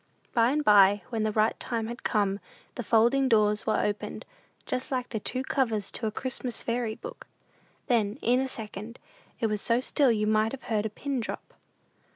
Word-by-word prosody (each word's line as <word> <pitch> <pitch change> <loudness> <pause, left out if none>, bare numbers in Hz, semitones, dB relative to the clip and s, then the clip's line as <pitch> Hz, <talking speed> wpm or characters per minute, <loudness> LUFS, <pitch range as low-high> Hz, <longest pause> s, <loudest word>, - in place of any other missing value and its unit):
But - - -36
by - - +3
and 300 +3 0
by, 200 -1 +6
when 225 -2 -2
the 215 0 +1
right 215 +1 +1
time 230 -2 -2
had 240 +2 -6
come, 200 -3 0 0.3
the - - -4
folding 240 +4 +3
doors 210 -2 +3
were 215 - +2
opened, 205 0 -3 0.4
just 255 - -3
like 255 -2 -2
the 220 - -3
two 255 +5 -1
covers 230 -7 0
to 225 - -2
a - - -2
Christmas 255 +1 -3
fairy 230 -2 -1
book. - - -10 0.6
Then, 225 -4 +1
in 245 +2 +3
a 265 - 0
second, 220 -1 -7 0.4
it - - 0
was 210 -2 -1
so 230 +1 +2
still 260 0 +2
you 210 -2 +1
might 215 +2 +2
have 270 - -7
heard 220 -2 0
a - - -7
pin 275 +5 -3
drop. 225 - -6
225 Hz, 195 wpm, -28 LUFS, 210-250 Hz, 0.6 s, by